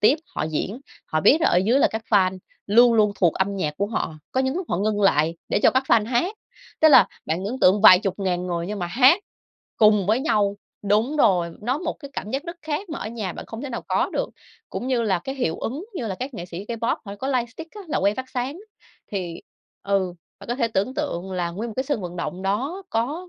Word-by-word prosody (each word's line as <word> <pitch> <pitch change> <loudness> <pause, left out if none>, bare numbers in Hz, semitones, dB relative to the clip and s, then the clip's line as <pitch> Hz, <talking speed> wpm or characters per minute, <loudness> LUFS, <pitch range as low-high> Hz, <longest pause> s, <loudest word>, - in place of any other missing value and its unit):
tiếp 265 +9 +5 0.2
họ - - -2
diễn, 185 - -3 0.3
họ 155 - 0
biết 270 - +5
là 335 - +4
ở - - +2
dưới 220 +9 +3
là - - +5
các 220 0 -4
fan 190 -3 +3 0.3
luôn 235 +4 +6
luôn 210 -2 +4
thuộc 175 -5 +2
âm 195 +1 -1
nhạc 150 -5 -2
của 200 +4 0
họ, 215 -7 -3 0.2
có 260 - +1
những 265 +1 0
lúc 370 - -3
họ - - +1
ngưng 205 +2 0
lại 165 -4 +3
để - - +1
cho - - +7
các 260 - +2
fan 215 -1 +4
hát, 260 - 0 0.5
tức 315 - +7
là 295 - +8 0.2
bạn 165 +5 -2
ấn 235 +6 -3
tượng 195 +3 +5
vài 185 -4 +9
chục 195 0 -3
ngàn 180 -2 -1
người 170 -1 -2
nhưng 210 +2 -4
mà 175 - -2
hát 260 - +5 0.6
cùng 210 -3 +4
với 220 +4 +2
nhau. 205 -9 +1 0.3
Đúng 215 +8 +1
rồi, 180 - +3
nó 250 +6 -1
một 330 -1 -2
cái 280 -2 -9
cảm 210 - -5
giác 270 +2 -2
rất 340 -1 -7
khác 310 +6 -3
mà 320 - -5
ở - - -5
nhà 215 -5 -4
bạn - - -9
không 225 +3 -7
thể 285 - -4
nào 235 - -4
có - - +1
được, - - -1 0.4
cũng 250 - -4
như 255 -3 +1
là 195 -5 +1
cái 270 +9 -6
hiệu 245 -12 -1
ứng 280 +10 -4
như 245 -10 -3
là 195 - -3
các 255 +6 -6
nghệ 175 - -6
sĩ 180 +2 -7
K-pop 230 0 -1
họ 200 - -7
có 265 +6 -4
lightstick 260 - -3
á, 420 - -8
là 305 - 0
que 200 +2 +2
phát 260 +2 -6
sáng. 260 +7 -3 0.5
Thì, 175 -4 -4 0.4
ừ, 195 -3 0 0.2
bạn - - -13
có 240 - 0
thể 235 -3 0
tưởng 220 +4 -1
tượng 190 - -3
là 175 -2 -1
nguyên 215 +7 -5
một 215 - -9
cái 260 - +1
sân 280 -5 -1
vận 180 -1 -6
động 175 +2 -4
đó 265 - -2
có 290 +11 -2
215 Hz, 255 wpm, -23 LUFS, 190-260 Hz, 0.6 s, vài